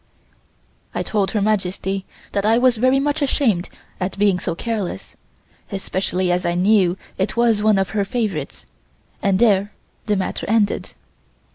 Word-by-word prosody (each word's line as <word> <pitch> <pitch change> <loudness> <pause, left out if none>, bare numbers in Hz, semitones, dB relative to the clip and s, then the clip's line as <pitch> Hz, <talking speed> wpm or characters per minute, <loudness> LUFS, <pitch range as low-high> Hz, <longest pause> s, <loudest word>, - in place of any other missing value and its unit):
I - - 0
told 200 -3 0
Her 205 0 0
Majesty 195 -2 -1 0.3
that 200 - 0
I 220 +2 +4
was 250 -1 +3
very 255 +4 +3
much 290 +2 0
ashamed 240 -10 +1 0.3
at 185 0 -3
being 200 -2 +3
so 170 - -3
careless, 220 -2 -4 0.6
especially 190 -2 -1
as 180 +1 +1
I 175 -1 0
knew 185 -1 +3 0.2
it 190 +4 -1
was 230 -3 +3
one 215 -1 +4
of 195 -1 0
her 210 -2 +1
favorites, 195 - -3 0.6
and 195 -2 +2
there 205 -2 +3 0.3
the 210 - +2
matter 190 0 -3
ended. 215 -2 +1
200 Hz, 150 wpm, -21 LUFS, 190-225 Hz, 0.6 s, I